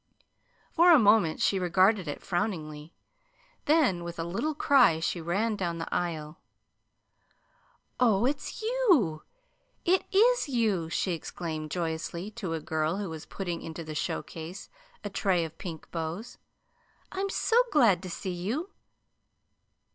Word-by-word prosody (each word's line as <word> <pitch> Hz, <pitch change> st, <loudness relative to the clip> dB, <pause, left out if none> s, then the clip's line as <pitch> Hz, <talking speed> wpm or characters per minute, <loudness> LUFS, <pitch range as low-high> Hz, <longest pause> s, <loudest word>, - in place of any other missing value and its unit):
For 345 Hz, +2 st, +6 dB
a 330 Hz, -, +9 dB
moment 205 Hz, -, +4 dB
she 195 Hz, -, +2 dB
regarded 185 Hz, +2 st, +3 dB
it 145 Hz, -, -5 dB
frowningly; 165 Hz, -5 st, -3 dB, 0.7 s
then, 285 Hz, -, +3 dB
with 170 Hz, 0 st, -7 dB
a 165 Hz, -, -2 dB
little 200 Hz, -, -2 dB
cry, 260 Hz, -, +4 dB
she 165 Hz, +1 st, -2 dB
ran 200 Hz, +7 st, 0 dB
down 175 Hz, -4 st, -2 dB
the 165 Hz, -, -5 dB
aisle. 160 Hz, -3 st, -3 dB, 1.6 s
"Oh, 230 Hz, -3 st, +3 dB
it's 285 Hz, -, -3 dB
you 370 Hz, -, +2 dB, 0.6 s
it 370 Hz, +2 st, +3 dB
IS 455 Hz, -2 st, +4 dB
you!" 215 Hz, -10 st, 0 dB
she 185 Hz, -, -1 dB
exclaimed 160 Hz, -2 st, -5 dB
joyously 170 Hz, +3 st, -3 dB
to 185 Hz, -5 st, -4 dB
a -, -, -3 dB
girl 155 Hz, +3 st, -1 dB
who 200 Hz, -4 st, -4 dB
was 160 Hz, -1 st, -8 dB
putting 175 Hz, -4 st, -4 dB
into 165 Hz, +1 st, -7 dB
the 155 Hz, -1 st, -7 dB
show 150 Hz, -, -2 dB
case 165 Hz, +4 st, -9 dB, 0.3 s
a 205 Hz, -, -4 dB
tray 185 Hz, -3 st, +1 dB
of 160 Hz, 0 st, -11 dB
pink 165 Hz, -4 st, -8 dB
bows. 165 Hz, +7 st, -5 dB, 0.7 s
"I'm 390 Hz, +1 st, -2 dB
so 465 Hz, +4 st, +3 dB
glad 225 Hz, -, +4 dB
to 185 Hz, -, -7 dB
see 180 Hz, +2 st, -4 dB
you!" 235 Hz, -, -3 dB
180 Hz, 140 wpm, -28 LUFS, 165-230 Hz, 1.6 s, a